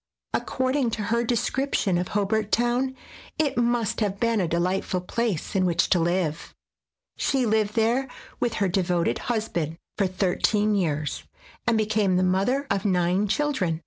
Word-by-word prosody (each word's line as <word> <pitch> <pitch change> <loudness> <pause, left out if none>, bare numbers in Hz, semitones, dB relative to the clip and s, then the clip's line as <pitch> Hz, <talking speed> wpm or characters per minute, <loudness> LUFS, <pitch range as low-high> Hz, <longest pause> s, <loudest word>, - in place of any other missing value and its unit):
According 260 -1 0
to 210 - -3
her 235 0 +2
descrip 250 +4 0
tion 180 -3 +1
of 180 - -2
Hobart 210 +1 0
Town, 245 +3 +1 0.4
it 305 -3 +1
must 240 -3 +1
have 200 -3 -1
been 230 -3 +2
a 175 - 0
delightful 180 +2 0
place 210 -1 -2
in 190 - +3
which 170 -2 +1
to 180 - +5
live. 170 -2 -1 0.6
She 265 -3 +1
lived 215 -1 +1
there 235 +4 +2 0.3
with 235 -2 0
her 200 - +1
devoted 180 -2 0
husband 175 -9 -2 0.2
for 195 - +3
thir 185 0 -1
teen 210 0 +2
years, 155 -7 -1 0.4
and 235 -2 +3
became 215 -3 +2
the 185 - +2
mother 195 +10 +1
of 200 -1 0
nine 185 0 +2
children. 200 - 0
205 Hz, 160 wpm, -25 LUFS, 180-235 Hz, 0.6 s, to